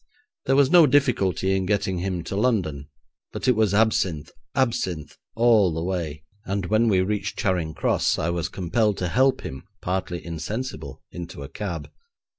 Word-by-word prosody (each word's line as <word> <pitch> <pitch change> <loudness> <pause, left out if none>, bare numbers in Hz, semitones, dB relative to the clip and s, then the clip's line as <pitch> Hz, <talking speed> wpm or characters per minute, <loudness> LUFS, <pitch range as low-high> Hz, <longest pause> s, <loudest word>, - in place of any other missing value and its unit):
There 135 - +4
was 140 -1 +4
no 175 -4 +8
difficulty 100 - +2
in 95 -1 -1
getting 95 -3 0
him 90 -2 -2
to 95 - -5
London, 90 - 0 0.4
but - - -4
it 125 - +5
was 110 -3 +2
absinthe, 95 -8 +1 0.2
absinthe, 95 - -1 0.2
all 115 -5 +4
the 80 - -2
way, 85 -5 -3 0.2
and 100 -1 -2
when 110 +5 +2
we 95 -4 +3
reached 105 +2 -2
Charing 85 -5 -1
Cross, - - +1
I 85 - 0
was 85 0 -2
compelled 100 +3 0
to 90 - -2
help 130 +7 +3
him, 65 - -7 0.2
partly 90 -1 -3
insensible, 105 +10 -5
into - - -7
a - - -8
cab. - - -5
95 Hz, 165 wpm, -24 LUFS, 85-110 Hz, 0.4 s, no